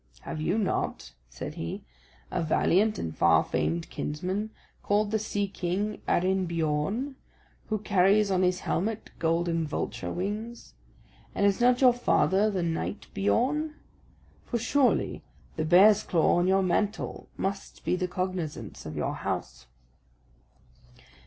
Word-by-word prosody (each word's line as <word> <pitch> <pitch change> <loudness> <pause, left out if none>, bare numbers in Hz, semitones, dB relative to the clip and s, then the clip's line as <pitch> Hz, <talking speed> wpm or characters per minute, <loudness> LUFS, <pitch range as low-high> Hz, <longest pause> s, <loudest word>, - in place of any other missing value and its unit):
"Have 155 - -5
you 180 +6 +1
not," 190 - -2 0.2
said - - -7
he, 85 +1 -5 0.5
"a - - -1
valiant 195 +6 +2
and 80 -1 -4
far - - +4
famed 170 0 -1
kinsman, 185 +8 -3 0.3
called 205 0 +1
the 220 - +1
Sea 205 -1 -1
king 195 +3 -3
Arinbiorn, 180 - 0 0.5
who 215 - 0
carries 200 0 +3
on 185 -1 +2
his 180 0 +1
helmet 215 +5 -2
golden 165 0 +1
vulture 150 - -3
wings? 210 - -5 0.6
And 200 - +2
is 200 +2 +2
not 245 +1 +4
your 250 -2 +7
father 200 -4 +2
the 190 -4 -1
knight 165 +5 -3
Biorn? 275 +10 +1 0.7
For 235 - -2
surely 260 +3 +1 0.3
the 155 - -1
bear's 195 +5 +6
claw 170 0 +2
on 175 +1 +2
your 190 +1 +3
mantle 205 +4 -1
must 195 0 -4
be - - +2
the 180 0 -1
cognisance 180 -3 -4
of - - -6
your - - -1
house." - - -4
190 Hz, 135 wpm, -28 LUFS, 170-215 Hz, 0.7 s, your